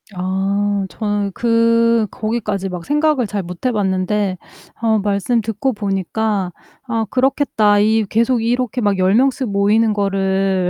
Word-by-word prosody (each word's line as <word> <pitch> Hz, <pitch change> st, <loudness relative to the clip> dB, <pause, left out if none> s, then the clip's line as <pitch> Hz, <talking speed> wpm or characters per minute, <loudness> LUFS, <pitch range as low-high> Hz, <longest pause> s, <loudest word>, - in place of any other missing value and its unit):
아, 195 Hz, +2 st, -1 dB
저는 205 Hz, -1 st, -2 dB
그 230 Hz, 0 st, +2 dB
거기까지 215 Hz, -4 st, -3 dB
막 180 Hz, -2 st, -6 dB
생각을 295 Hz, -4 st, +1 dB
잘 200 Hz, -1 st, -3 dB
못 180 Hz, +6 st, -9 dB
해봤는데 195 Hz, -3 st, 0 dB, 0.4 s
어 220 Hz, -2 st, +2 dB
말씀 205 Hz, +4 st, 0 dB
듣고 225 Hz, +5 st, -2 dB
보니까 200 Hz, -1 st, -2 dB, 0.4 s
'아 225 Hz, -2 st, -1 dB
그렇겠다. 255 Hz, -6 st, +2 dB
이 220 Hz, +1 st, +2 dB
계속 235 Hz, +2 st, +1 dB
이렇게 245 Hz, +1 st, -1 dB
막 205 Hz, -3 st, +1 dB
10 185 Hz, +2 st, +2 dB
명씩 260 Hz, 0 st, +1 dB
모이는 210 Hz, +2 st, +2 dB
거를 195 Hz, -2 st, 0 dB
210 Hz, 255 characters per minute, -18 LUFS, 195-230 Hz, 0.4 s, 그